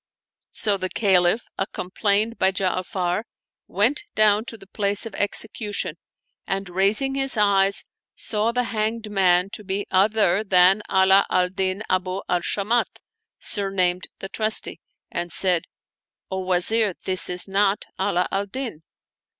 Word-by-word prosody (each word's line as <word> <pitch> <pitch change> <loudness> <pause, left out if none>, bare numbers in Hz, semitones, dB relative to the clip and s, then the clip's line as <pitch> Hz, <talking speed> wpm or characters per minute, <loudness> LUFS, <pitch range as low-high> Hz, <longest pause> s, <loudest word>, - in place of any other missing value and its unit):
So 205 -2 +2
the 185 - -2
Caliph, 190 +1 +2 0.2
ac 190 - 0
complained 205 +4 0
by 190 - +3
Ja'afar 185 +1 -1 0.4
went 230 - 0
down 215 0 +3
to 225 - -6
the 195 - -15
place 200 +1 -1
of 225 - -7
execu 210 +1 0
tion 175 -5 -2 0.5
and, 195 0 -2
raising 205 +9 +2
his 270 -2 +2
eyes, 200 -1 +2 0.3
saw 215 +1 -1
the 250 +1 0
hanged 220 -1 -3
man 185 -1 +3
to 210 - -7
be 200 +1 -3
other 205 0 +3
than 190 0 +5
Ala 190 +1 +5
al 180 0 +2
Din 190 +2 -2
Abu 185 +1 -1
al 180 -1 0
Shamat, 210 +6 -1 0.4
sumamed 185 -3 -1
the 195 - -7
Trusty, 215 +1 -2 0.3
and 175 0 -4
said, 180 -2 +2 0.3
" - - -44
O 190 - -2
Wazir, 190 +3 +1
this 185 -1 +1
is 180 +1 +1
not 195 +1 +1
Ala 190 -2 +1
al 200 +1 -1
Din 230 - -5
195 Hz, 145 wpm, -23 LUFS, 185-215 Hz, 0.5 s, than